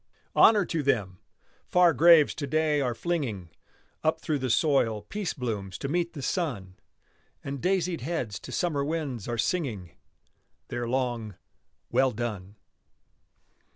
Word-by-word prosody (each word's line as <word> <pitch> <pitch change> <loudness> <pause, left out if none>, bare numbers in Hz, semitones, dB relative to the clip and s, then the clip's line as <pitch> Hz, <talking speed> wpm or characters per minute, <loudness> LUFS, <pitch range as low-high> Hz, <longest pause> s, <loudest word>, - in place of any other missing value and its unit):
Honor 210 -4 +6
to 165 -2 -2
them! 100 -10 0 0.5
Far 180 -2 +5
graves 165 +1 +6
to 145 - -5
day 155 0 +1
are 125 -3 -1
flinging 115 - -3 0.5
Up 160 +1 +1
through 155 -2 -1
the 130 -1 -2
soil 115 -6 +2
peace 205 -3 -4
blooms 105 - -4
to - - -4
meet 170 +3 -1
the 140 -5 -7
sun, 120 - -3 0.6
And 140 -1 -5
daisied 180 -4 0
heads 125 - -3
to - - -10
summer 155 -6 0
winds 145 -8 -3
are 120 -1 -2
singing 115 - -2 0.8
Their 120 -1 -3
long 120 -5 -2 0.6
"well 130 +2 +4
done." 105 -4 -5
135 Hz, 135 wpm, -27 LUFS, 115-165 Hz, 0.8 s, Honor